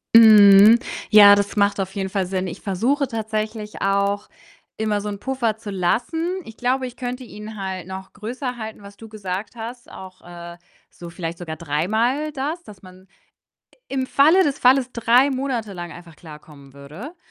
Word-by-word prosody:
Mhm. 215 0 +8 0.3
Ja, 205 -1 +9
das 200 +1 -2
macht 200 -1 +1
auf 190 0 -3
jeden 190 -1 -3
Fall 195 -1 -1
Sinn. 185 0 -3
Ich 170 - -8
versuche 250 +9 0
tatsächlich 215 -1 -5
auch, 200 +1 0 0.5
immer 210 -2 -1
so 210 - -5
'n 200 - -6
Puffer 240 -3 -2
zu 215 -2 -8
lassen. 320 - -1
Ich 225 - -12
glaube, 255 +2 -1
ich 245 - -8
könnte 250 +1 -5
ihn 215 -2 -10
halt 190 -2 -5
noch 190 0 -9
größer 245 +4 -6
halten, 220 -2 -8
was 200 0 -13
du 225 0 -13
gesagt 205 +1 -6
hast, 235 +1 -9
auch, 185 -1 -12
äh, 170 0 -10 0.4
so 170 -1 -11
vielleicht 170 -1 -6
sogar 160 -3 -6
dreimal 220 - -1
das, 295 +5 -4
dass 200 - -15
man 185 +1 -16 0.8
im 265 -1 -2
Falle 320 +7 +4
des 285 -1 -2
Falles 255 0 +3
3 240 +4 +3
Monate 255 -6 -3
lang 175 -1 -7
einfach 170 -2 -13
klarkommen 150 -4 -14
würde. 160 - -11
210 Hz, 175 wpm, -21 LUFS, 190-245 Hz, 0.8 s, Ja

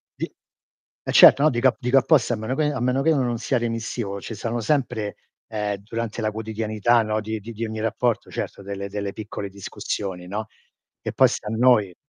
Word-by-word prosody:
di - - -4 0.7
eh - - -3
certo, 140 - +9
no, 155 - +6
dico 130 0 +3
a - - -4
dico 125 +1 +2
apposta, 130 -3 +4
a - - -1
meno 110 +5 -3
che 155 - +1
a 130 - -3
meno 125 +2 +1
che 160 +3 +3
non 120 -4 0
sia 125 +2 0
remissivo 115 -3 -3
ce' 115 - -7
stanno, 115 +2 -3 0.9
ehm, 105 -2 -2
durante 115 +2 -5
la 110 0 0
quotidianità, 110 +1 +1
no, 110 0 -1
di 110 0 -4
di 115 +3 -9
di 115 +2 -3
ogni 110 0 -5
rapporto, 115 +1 0
certo, - - -5
delle 100 0 -5
delle 100 -1 -4
piccole 105 -2 -6
discussioni, 95 -1 -5
no, 105 +3 -4 0.5
e - - -4
poi - - +6
sta - - -5
a 110 - -2
noi 110 -7 +4
110 Hz, 200 wpm, -24 LUFS, 105-120 Hz, 0.9 s, certo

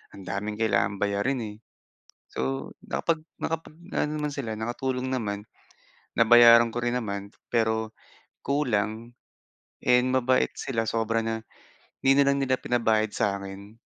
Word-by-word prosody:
ang 100 - -10
daming 105 +2 -3
kailangan 100 -2 +2
bayarin, 105 +6 0
eh. - - -12 0.8
So, - - -3 0.5
nakapag 165 -1 0 0.2
nakapag 160 -1 -3 0.2
aano 150 - +1
naman 150 -1 -2
sila, 115 -6 -3
nakatulong 125 +2 -2
naman. 105 -5 -2 0.8
Nabayaran 115 0 +8
ko - - -2
rin 120 +1 0
naman. 100 -3 -4 0.3
Pero 110 -2 +3 0.7
kulang 115 -4 -1 0.7
and, 125 0 +4
mabait 130 0 +2
sila 115 -4 -1
sobra 115 0 0
na 115 0 -1 0.7
'di 135 - +5
na 140 - +6
lang 140 - +1
nila 130 -1 +2
pinabayad 110 -3 +2
sa - - +1
akin. 100 +2 -9
115 Hz, 135 wpm, -26 LUFS, 110-130 Hz, 0.8 s, Nabayaran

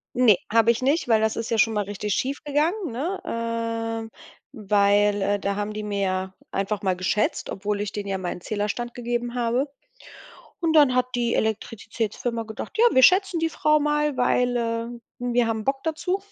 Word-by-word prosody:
Ne, 240 -6 +5
habe 225 0 +4
ich 235 +2 +2
nicht, 285 +4 +1
weil 225 -2 +4
das 220 0 +1
ist 230 - -4
ja 230 - +1
schon 225 0 +3
mal 210 -1 0
richtig 205 +1 -3
schief 275 +2 -2
gegangen, 315 - 0
ne 315 +12 -3
ähm, 230 -1 -3 0.4
weil, 205 0 +2
äh, 205 +1 +1
da 200 0 -1
haben 205 +1 -3
die 215 - -4
mir 205 -1 -3
ja 190 0 -2 0.2
einfach 200 +1 -2
mal 190 -2 +1
geschätzt, 185 +4 -1
obwohl 205 +1 -2
ich 205 -1 -3
denen 205 -1 -4
ja 195 -1 -2
meinen 180 -1 -4
Zählerstand 215 +5 -3
gegeben 240 0 -3
habe. 245 +3 0 0.9
Und 330 -2 +1
dann 290 -5 +6
hat 250 0 +2
die 240 -1 0
Elektrizitätsfirma 225 +1 -2
gedacht: 220 0 -7
„Ja, 460 - +6
wir 260 - +5
schätzen 375 +4 +5
die 325 0 0
Frau 305 0 +3
mal, 295 -1 0
weil, 245 0 +2
äh, 230 -1 -1 0.3
wir 245 -1 +1
haben 220 -1 -2
Bock 270 +2 -1
dazu.“ 330 +4 -1
230 Hz, 190 wpm, -24 LUFS, 210-255 Hz, 0.9 s, dann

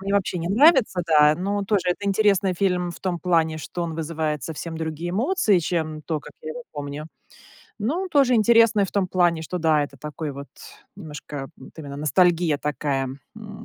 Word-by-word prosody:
Мне 195 +1 -3
вообще 185 -2 0
не 170 +1 -3
нравится, 255 - +4
да. 150 -1 +5
Но 200 +3 -2
тоже 200 -2 +1
это 200 +3 -3
интересный 195 -2 +2
фильм 180 -2 0
в 170 - -10
том 180 -2 -2
плане, 165 -3 +1
что 175 +3 -5
он 165 -2 -4
вызывает 155 -3 -3
совсем 165 +1 -6
другие 160 +2 -4
эмоции, 220 - +2
чем 155 -2 -2
то, 155 -2 -3
как - - -13
я 155 - -5
его 245 - -7
помню. 145 +1 -6 0.7
Но 265 - -1
он 380 - -4
тоже 275 -6 +3
интересный 225 -1 +5
в - - -10
том 200 -2 +1
плане, 175 -3 +2
что 180 +3 -4
да, 155 -2 +3
это 140 -1 -11
такой 150 0 -5
вот 140 +1 -9 0.5
немножко, 150 -5 -8
вот 130 - -14
именно 140 -2 -7
ностальгия 160 +1 +2
такая, 140 -3 -2 0.3
м. 215 0 -10
175 Hz, 190 wpm, -23 LUFS, 155-200 Hz, 0.7 s, да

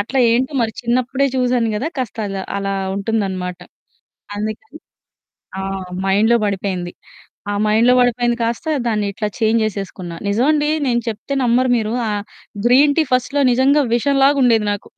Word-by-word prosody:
అట్లా 235 +6 -2
ఏంటో 260 +5 0
మరి 225 - -1
చిన్నప్పుడే 255 +3 +1
చూసాను 245 -2 +1
గదా! 265 +9 -2
కాస్తలా 205 -5 -3 0.2
అలా 195 0 -2 0.2
ఉంటుందన్నమాట. 195 -4 -2 0.8
అందుకని 220 +9 -6 0.8
ఆ! - - -3 0.4
మైండ్‌లో 210 +5 +3
బడిపోయింది. 190 -3 -3 0.6
ఆ 205 - -1
మైండ్‌లో 225 +4 +4
బడిపోయింది 240 -1 +1
కాస్త 230 +6 -2 0.2
దాన్నిట్లా 210 -2 -1
చేంజ్ 225 -1 +2
జేసేసుకున్న. 195 -4 -5 0.2
నిజమండి 295 +8 +2 0.2
నేను 240 -2 +1
చెప్తే 230 +5 -5
నమ్మరు 250 +1 +2
మీరు 220 0 -2 0.2
ఆహ్, 205 -1 -2 0.4
గ్రీన్ 280 +4 +5
టీ - - +5
ఫస్ట్‌లో 275 +3 +1
నిజంగా 275 +4 +3
విషం 275 +4 +1
లాగా 280 +1 +4
ఉండేది 225 -3 +3
నాకు. 205 - -6
230 Hz, 135 wpm, -18 LUFS, 205-255 Hz, 0.8 s, గ్రీన్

